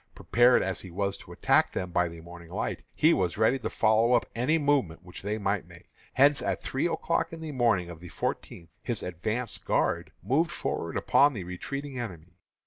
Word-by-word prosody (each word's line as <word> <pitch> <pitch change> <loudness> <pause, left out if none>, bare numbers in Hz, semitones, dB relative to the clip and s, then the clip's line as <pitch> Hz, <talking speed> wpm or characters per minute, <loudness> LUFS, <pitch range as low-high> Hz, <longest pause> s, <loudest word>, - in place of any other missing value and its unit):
Prepared 120 +1 +4
as 95 -1 -2
he 95 - -9
was 100 +3 -2
to - - -14
attack - - +2
them 90 -1 -3
by 90 0 +2
the 85 -1 -9
morning 85 0 -12
light, - - -3
he 160 +2 +5
was 90 -1 0
ready 110 +5 +3
to - - -3
follow 110 +2 +3
up 120 - +3
any 130 +8 +2
movement 135 - +1
which 90 0 -10
they 105 +2 -2
might 100 -1 -1
make. - - -16 0.2
Hence, 140 +2 +5
at 95 -1 -2
three 135 +6 0
o'clock 165 -1 -1
in 165 - -8
the 160 -1 -6
morning 115 -9 +2
of 85 -2 -9
the 90 +1 -10
fourteenth, 85 +1 -4
his 120 -4 -4
advance 105 +7 -3
guard - - 0
moved 145 - +2
forward - - -3
upon 145 +1 +4
the 100 -6 -5
retiring 135 +10 -5
enemy. 90 -6 -8
110 Hz, 200 wpm, -28 LUFS, 90-135 Hz, 0.2 s, he